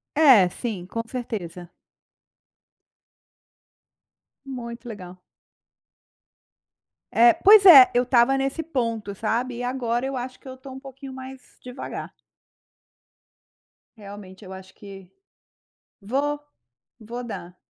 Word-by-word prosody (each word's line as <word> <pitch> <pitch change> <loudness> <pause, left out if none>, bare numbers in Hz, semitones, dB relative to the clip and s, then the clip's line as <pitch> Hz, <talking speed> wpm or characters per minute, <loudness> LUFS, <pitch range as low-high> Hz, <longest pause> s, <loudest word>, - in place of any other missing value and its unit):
É, 265 - +6
sim, 200 -3 -6
com 230 +5 -5
certeza. 180 -8 -7 2.7
Muito 240 -2 -8
legal. 185 -5 -10 1.9
É, 235 +1 +6
pois 410 0 +6
é, 280 -9 +10
eu 245 - +2
estava 250 +1 +3
nesse 270 +4 -2
ponto, 230 -9 -3
sabe, 235 +4 -3
e 245 - -5
agora 245 -1 -2
eu 270 0 -4
acho 255 0 -6
que - - -17
eu 260 - -8
tô 265 +1 -13
um 260 - -9
pouquinho 270 0 -11
mais 260 0 -10 0.2
devagar. 250 +1 -8 1.8
Realmente 200 -2 -12
eu 190 - -10
acho 190 0 -12
que 195 -2 -13 0.9
vou, 280 +8 -2 0.6
vou 235 +3 -8
dar. 180 -6 -9
240 Hz, 110 wpm, -23 LUFS, 205-265 Hz, 2.7 s, é